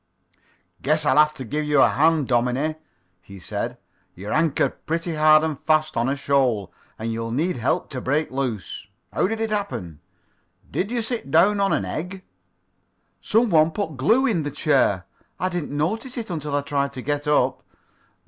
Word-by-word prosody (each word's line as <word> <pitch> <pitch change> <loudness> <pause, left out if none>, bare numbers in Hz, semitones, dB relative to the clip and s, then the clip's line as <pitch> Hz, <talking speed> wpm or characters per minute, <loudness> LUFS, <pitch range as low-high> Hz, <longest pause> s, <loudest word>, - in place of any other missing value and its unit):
"Guess 155 +2 +1
I'll - - +3
have 150 0 +5
to 130 - -6
give 150 +6 -2
you 150 0 +2
a - - +6
hand, 155 -2 +2
dominie," 125 +5 +1 0.5
he 100 +2 -12
said. 90 - -4 0.4
"You're 100 +4 -5
anchored 155 -1 0
pretty 165 +1 -1
hard 155 0 +5
and 155 -3 -2
fast 155 0 +2
on 120 +2 +1
a 140 - 0
shoal, 130 -8 +1 0.2
and 115 +1 -3
you'll 115 0 -3
need 155 +7 -1
help 120 +5 -1
to 130 -3 -4
break 145 +5 0
loose. 120 -8 -4 0.3
How - - +2
did 225 +2 -3
it 225 -1 -1
happen? 95 - -3 0.7
Did 195 - -1
you 240 -1 -1
sit 225 - -4
down 195 +8 +4
on 195 0 +2
an 100 - +1
egg?" 180 - -5 1.0
"Some 225 0 +2
one 155 -1 +5
put 160 -3 -4
glue 225 - +3
in 210 -11 +1
the 145 - -3
chair. 135 - +1 0.3
I 185 - 0
did 175 -4 -3
not 145 +3 0
notice 235 +3 -6
it 225 -5 -4
until 150 -3 -3
I 145 - +1
tried 140 -1 -1
to 130 -1 -7
get 145 +1 -2
up." 150 - +2
150 Hz, 185 wpm, -23 LUFS, 130-175 Hz, 1.0 s, a